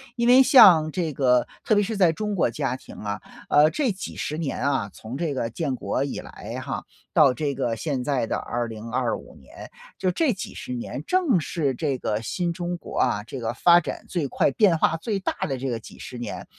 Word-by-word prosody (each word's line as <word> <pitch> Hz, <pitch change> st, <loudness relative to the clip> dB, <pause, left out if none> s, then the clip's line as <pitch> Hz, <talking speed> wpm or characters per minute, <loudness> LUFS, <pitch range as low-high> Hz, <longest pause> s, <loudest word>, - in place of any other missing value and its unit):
因 235 Hz, -1 st, 0 dB
为 255 Hz, +2 st, +8 dB
像 165 Hz, -, +7 dB
这 165 Hz, -2 st, -2 dB
个 125 Hz, -2 st, +3 dB, 0.2 s
特 -, -, +2 dB
别 205 Hz, -, +3 dB
是 220 Hz, +3 st, -3 dB
在 180 Hz, -4 st, +5 dB
中 210 Hz, +5 st, -3 dB
国 180 Hz, -, +2 dB
家 135 Hz, -3 st, -2 dB
庭 130 Hz, -, -12 dB
啊， 105 Hz, -1 st, -4 dB, 0.3 s
呃， 150 Hz, +1 st, +6 dB
这 265 Hz, -, 0 dB
几 195 Hz, 0 st, -7 dB
十 150 Hz, -, -3 dB
年 160 Hz, -4 st, -3 dB
啊， 135 Hz, -8 st, 0 dB
从 115 Hz, +4 st, -8 dB
这 160 Hz, -2 st, -1 dB
个 120 Hz, -3 st, -2 dB
建 140 Hz, +3 st, -2 dB
国 130 Hz, -, -2 dB
以 140 Hz, -, -4 dB
来 115 Hz, +4 st, -8 dB
哈 135 Hz, +1 st, -4 dB, 0.3 s
到 150 Hz, -8 st, +6 dB
这 140 Hz, +2 st, -2 dB
个 115 Hz, -2 st, -1 dB
现 135 Hz, +1 st, -2 dB
在 130 Hz, -4 st, 0 dB
的 -, -, -1 dB
2025 115 Hz, +1 st, -3 dB
年， 65 Hz, -, -12 dB, 0.3 s
就 185 Hz, -1 st, 0 dB
这 265 Hz, -, +1 dB
几 190 Hz, -, -7 dB
十 -, -, -6 dB
年， 125 Hz, +3 st, -5 dB
正 340 Hz, -, +3 dB
是 155 Hz, -3 st, -1 dB
这 135 Hz, +1 st, -1 dB
个 110 Hz, -3 st, -2 dB
新 175 Hz, +8 st, -2 dB
中 175 Hz, 0 st, -3 dB
国 -, -, -9 dB
啊， 110 Hz, -5 st, +1 dB
这 130 Hz, +4 st, -7 dB
个 115 Hz, -1 st, -2 dB
发 170 Hz, +8 st, +6 dB
展 175 Hz, -, -6 dB
最 165 Hz, -6 st, -2 dB
快、 135 Hz, -, +1 dB
变 185 Hz, +1 st, +4 dB
化 160 Hz, -, +2 dB
最 200 Hz, +4 st, -2 dB
大 190 Hz, -, -2 dB
的 135 Hz, -4 st, -2 dB
这 130 Hz, +1 st, -3 dB
个 115 Hz, -2 st, -2 dB
几 -, -, -13 dB
十 125 Hz, -, -8 dB
年 120 Hz, -, -6 dB
145 Hz, 230 characters per minute, -24 LUFS, 125-175 Hz, 0.3 s, 为